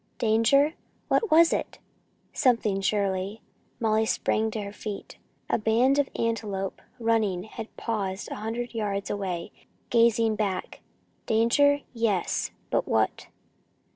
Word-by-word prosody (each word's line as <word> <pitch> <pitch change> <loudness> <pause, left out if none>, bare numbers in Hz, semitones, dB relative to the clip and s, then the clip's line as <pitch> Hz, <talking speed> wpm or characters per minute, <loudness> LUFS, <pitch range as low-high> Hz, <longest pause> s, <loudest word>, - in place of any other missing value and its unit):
Danger? 235 +7 +3 0.4
What 450 - +2
was 330 +1 +6
it? - - -3 0.6
Something, 225 -7 +2
surely. 195 +1 -1 0.4
Molly 220 -1 +2
sprang 220 0 +1
to 215 0 -4
her 200 0 -7
feet. 210 -1 -7 0.3
A - - +1
band 240 +6 +3
of 280 - +1
antelope, 205 -4 -2 0.2
running, 220 -6 +1
had 220 +1 -9
paused 200 -4 -3
a - - -3
hundred 230 +3 -4
yards 205 -3 -2
away, 190 -2 -3 0.4
gazing 230 -1 +4
back. 195 -4 -3 0.5
Danger 285 +6 +4
yes; 225 -6 0 0.2
but - - +1
what? - - 0
220 Hz, 120 wpm, -27 LUFS, 200-230 Hz, 0.6 s, was